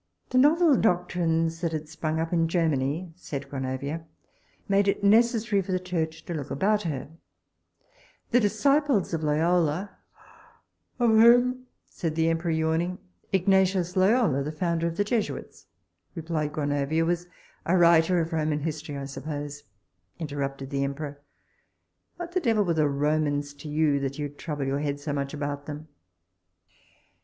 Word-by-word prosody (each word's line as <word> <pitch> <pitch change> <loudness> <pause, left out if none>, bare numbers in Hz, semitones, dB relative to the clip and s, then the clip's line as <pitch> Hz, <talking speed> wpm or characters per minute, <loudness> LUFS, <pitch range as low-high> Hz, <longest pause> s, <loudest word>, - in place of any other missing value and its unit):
The 255 - +4
novel 305 +1 +5
doctrines 170 -4 +1
that 165 -2 -1
had 155 -1 -4
sprung 160 0 -3
up 165 +2 -2
in 165 -1 +2
Germany, 160 0 0
said 145 -6 -6
Gronovia, 135 +3 -4 0.6
made 200 0 +3
it 200 - 0
necessary 220 0 +3
for 190 - -6
the 185 - +1
church 165 -3 -3
to 175 - -4
look 145 -4 -5
about 205 +8 +1
her. 145 -8 -4 1.2
The 245 - +5
disciples 255 - +2
of 165 - -1
Loyola 165 +4 +1 1.0
Of 240 -2 +3
whom? 245 +3 +5 0.2
said 165 -4 -4
the 165 0 +2
emperor, 165 +1 -1
yawning 160 +3 0 0.3
Ignatius 190 -1 +2
Loyola, 190 - +3
the 145 +2 -3
founder 170 +1 -1
of 165 0 -5
the 205 - +3
Jesuits, 215 0 -3 0.5
replied 160 -3 -2
Gronovia, 145 +2 0
was 175 +1 -1 0.4
A 185 +3 +3
writer 170 +1 +5
of 165 +1 -4
Roman 155 -1 0
history, 150 -1 -4
I 140 - -5
suppose, 145 +1 -6 0.5
interrupted 140 -3 -4
the 140 0 0
emperor: 145 +1 -5 0.9
what 345 -1 -7
the 370 - +1
devil 225 - +2
were 170 - +1
the 155 -2 +2
Romans 145 0 0
to 145 +2 -10
you, 150 -1 +2
that 135 0 -3
you 145 -1 -3
trouble 145 0 -5
your 135 +1 -1
head 145 -1 -2
so 145 0 -4
much 140 -1 -2
about 145 0 -4
them? 150 +1 -7
160 Hz, 150 wpm, -26 LUFS, 145-185 Hz, 1.2 s, novel